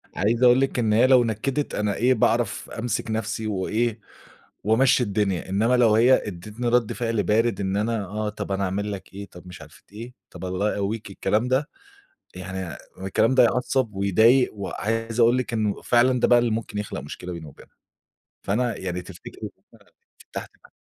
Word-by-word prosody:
عايِز 115 +5 +1
أقول 125 +1 +6
لِك 135 -2 0
إن 110 -2 +1
هي 120 +4 +5
لو 130 -2 +6
نكَدِت 125 +6 -2
أنا 105 -1 -1
إيه، 125 +2 +3
باعرَف 115 -1 0
أمسِك 115 -1 -2
نفسي 110 0 -3
وإيه، 110 +3 -1 0.7
وأمشِي 125 +4 +4
الدنيا. 100 -4 -1
إنما 110 +6 +2
لو 115 -3 +4
هي 120 +4 +4
أدَّتني 105 +6 -5
رد 120 -2 +2
فعل 115 -1 -1
بارد، 115 +1 +1
"إن 95 0 -1
أنا 110 0 -1
آه، 105 +3 -3
طَب 105 -1 -5
أنا 95 0 -1
أعمَل 100 +2 -2
لك 95 -1 -9
إيه؟ 100 +1 -7
طَب 90 +1 -14
مش 90 - -11
عارفة 75 -1 -15
إيه، 115 +4 -9 0.2
طَب 90 +1 -9
الله 95 +3 -1
يقوِّيك." 105 +1 -3
الكلام 110 +4 0
ده 130 +3 +1 0.7
يعني، 95 +1 -6
يعني 85 -7 -5 0.3
الكلام 115 +6 +2
ده 130 - +6
يعصِّب 125 -2 0
ويضايِق، 110 +7 +3
وعايِز 115 +3 -3
أقول 120 +2 +5
لِك 125 -2 -3
إنه 110 -3 -1
فعلًا 125 +1 +3
ده - - +3
بقى 120 - +6
اللي 120 -1 +1
ممكن 110 -1 -3
يخلُق 105 -8 -4
مشكلة 75 +6 -8
بيني 85 -2 -8
وبينها، 70 - -16 0.7
فأنا 120 +4 -1
يعني، 90 -1 -4
تفتكري - - -12
إن - - -4 0.3
أنا - - -25 0.4
فتَحت - - -6
م - - -22
110 Hz, 185 wpm, -24 LUFS, 100-120 Hz, 0.7 s, أقول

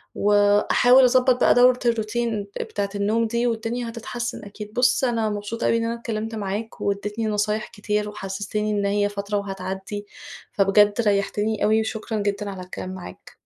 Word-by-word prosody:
وأحاول 205 +5 +4
أضبط 255 0 +4
بقى - - +6
دورة 250 0 +5
الروتين 230 -1 0 0.2
ب - - -1
بتاعة 200 -1 -3
النوم 215 +3 +1
دي 235 +2 0
والدنيا 230 +1 -2
هتتحسن 240 0 -5
أكيد. 210 +1 -9
بُص، 250 +2 +2
أنا 230 -3 +1
مبسوطة 210 +2 -4
أوي 230 - +3
إن 230 - -1
أنا 230 - -1
اتكلمت 225 -1 -4
معاك 210 +2 -4
وادّيتني 210 +2 -2
نصايح 210 0 -1
كتير، 210 0 -2
وحسستني 210 +1 -3
إن 205 -1 0
هي 205 0 +1
فترة 205 0 -3
وهتعدّي، 195 +1 -5 0.5
فبجد 205 +1 +4
ريحتني 210 0 0
أوي، 220 +1 +4
وشكرًا 220 0 -4
جدًا 205 0 -2
على 190 -2 -7
الكلام 185 0 -7
معاك. 180 - -10
210 Hz, 160 wpm, -23 LUFS, 205-230 Hz, 0.5 s, بقى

